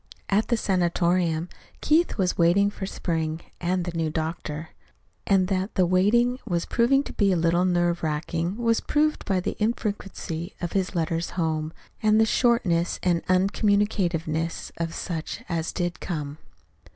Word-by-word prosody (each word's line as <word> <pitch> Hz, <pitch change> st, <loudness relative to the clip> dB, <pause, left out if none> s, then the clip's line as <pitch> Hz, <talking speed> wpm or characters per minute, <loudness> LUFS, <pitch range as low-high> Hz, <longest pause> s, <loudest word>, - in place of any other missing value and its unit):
At 205 Hz, +2 st, +2 dB
the 235 Hz, -, +1 dB
sanatorium 175 Hz, -3 st, +1 dB, 0.3 s
Keith 320 Hz, +3 st, +2 dB
was 185 Hz, -3 st, +1 dB
waiting 185 Hz, +4 st, +4 dB
for 190 Hz, -, -5 dB
spring 160 Hz, -3 st, -2 dB, 0.2 s
and 180 Hz, 0 st, 0 dB
the 175 Hz, -1 st, -5 dB
new 165 Hz, -1 st, 0 dB
doctor; 155 Hz, 0 st, -4 dB, 0.6 s
and 190 Hz, -2 st, +3 dB
that 190 Hz, +1 st, -1 dB
the 185 Hz, -, +4 dB
waiting 230 Hz, +8 st, +3 dB
was 170 Hz, -2 st, -1 dB
proving 270 Hz, +4 st, +3 dB
to -, -, -8 dB
be 200 Hz, -2 st, +2 dB
a -, -, +3 dB
little 170 Hz, +1 st, +2 dB
nerve 175 Hz, -1 st, +1 dB
racking 165 Hz, +4 st, -2 dB
was 230 Hz, -1 st, +2 dB
proved 305 Hz, +1 st, +1 dB
by 190 Hz, -2 st, +1 dB
the 180 Hz, -, -3 dB
infrequency 200 Hz, -6 st, -3 dB
of 175 Hz, -, -3 dB
his 190 Hz, -1 st, -1 dB
letters 165 Hz, 0 st, -1 dB
home, 160 Hz, -2 st, -1 dB, 0.3 s
and 215 Hz, 0 st, +4 dB
the 220 Hz, -, +5 dB
shortness 210 Hz, -8 st, +2 dB
and 175 Hz, -2 st, +1 dB
uncommunicativeness 185 Hz, -4 st, +1 dB
of 165 Hz, 0 st, -3 dB
such 165 Hz, -3 st, -4 dB
as 165 Hz, -2 st, -2 dB
did 175 Hz, 0 st, -3 dB
come. 150 Hz, -4 st, -4 dB
180 Hz, 150 wpm, -25 LUFS, 165-200 Hz, 0.6 s, the